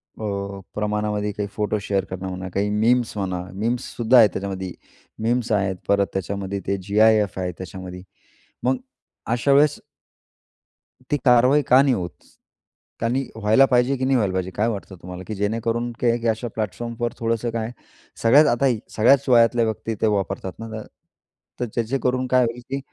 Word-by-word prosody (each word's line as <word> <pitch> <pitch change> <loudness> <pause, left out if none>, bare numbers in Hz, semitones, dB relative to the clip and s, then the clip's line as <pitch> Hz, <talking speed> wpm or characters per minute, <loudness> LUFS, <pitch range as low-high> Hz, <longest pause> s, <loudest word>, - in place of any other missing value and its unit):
अ, 100 -2 -4 0.2
प्रमाणामध्ये 105 0 -1
काही 100 0 -4
photo 105 0 -1
share 100 -1 0
करणं 95 0 -6
म्हणा, 95 0 -5
काही 100 +1 0
मीम्स 115 +3 +2
म्हणा, 95 -3 -2
मीम्ससुद्धा 120 +3 +1
आहे 115 -3 +8
त्याच्यामध्ये. 95 -2 -5 0.5
मीम्स 120 0 0
आहेत, 100 -3 +1
परत 100 -1 +3
त्याच्यामध्ये 100 +1 -3
ते 100 +1 0
जी-आय-एफ 105 0 +3
आहे, 90 -1 -2
त्याच्यामध्ये. 90 0 -8 0.6
मग 130 +1 +2 0.5
अशा 120 +4 +1
वेळेस 145 +1 +4 1.3
ती 145 - +2
कारवाई 125 +4 +5
का 130 0 +6
नाही 140 -2 +3
होत? 90 -7 -3 0.9
कारण 115 +2 0
ही 135 0 -2
व्हायला 110 +5 +4
पाहिजे 125 +2 +3
की 130 - -1
नाही 135 0 +2
व्हायला 100 -5 0
पाहिजे? 95 0 -2
काय 105 +5 0
वाटतं 100 -3 -6
तुम्हाला? 90 +1 -8
की 110 - -4
जेणेकरून 115 +4 -1
की 125 - +1
एक 120 0 +1
अशा 110 +2 -1
प्लॅटफॉर्मवर 115 +3 -3
थोडंसं 115 0 -1
काय 115 0 -3 0.5
सगळ्यात, 140 +7 +7
आता 120 +2 +2
हे 125 -5 +2 0.2
सगळ्याच 135 +5 +4
वयातल्या 120 -1 +5
व्यक्ती 110 0 -3
ते 110 - +3
वापरतात 95 -1 -4
ना, 115 - -6 0.9
तर 125 - 0
त्याचे 120 +3 0
करून 130 0 0
काय 125 0 +4
होईल, 115 +1 -4
की 135 +1 -2
110 Hz, 165 wpm, -23 LUFS, 100-120 Hz, 1.3 s, आहे